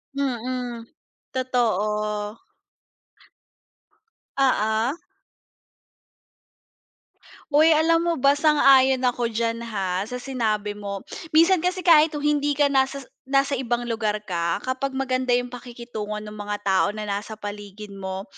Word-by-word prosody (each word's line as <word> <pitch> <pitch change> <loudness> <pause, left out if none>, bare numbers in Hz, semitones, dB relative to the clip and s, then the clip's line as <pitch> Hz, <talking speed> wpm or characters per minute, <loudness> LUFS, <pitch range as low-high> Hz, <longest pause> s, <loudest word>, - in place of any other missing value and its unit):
Mm, 250 -3 -3 0.5
totoo. 215 -4 -1 2.0
Oo. 230 0 +2 2.6
Uy, 305 +3 +5
alam 330 +2 +3
mo 335 - +2
ba 275 0 +4
sang-ayon 275 -3 +4
ako 245 -1 +1
diyan, 230 0 -1
ha, 195 -4 -3
sa 250 - -6
sinabi 225 -5 -2
mo. 200 -1 -6 0.3
Minsan 335 +3 +6
kasi 360 +2 -1
kahit 315 -3 +5
o 290 - -4
hindi 290 -1 +1
ka 285 0 +3
nasas 270 0 +1 0.3
nasa 275 -1 +2
ibang 240 -1 -1
lugar 215 -2 -1
ka 170 -1 -2
kapag 265 +1 -3
maganda 255 -2 +1
'yong 245 0 -2
pakikitungo 235 -4 -7
no'ng 210 0 -9
mga 205 0 -4
tao 195 0 +3
na 215 - -4
nasa 205 +1 -4
paligid 205 0 -8
mo, 190 -1 -5
240 Hz, 120 wpm, -24 LUFS, 210-275 Hz, 2.6 s, Minsan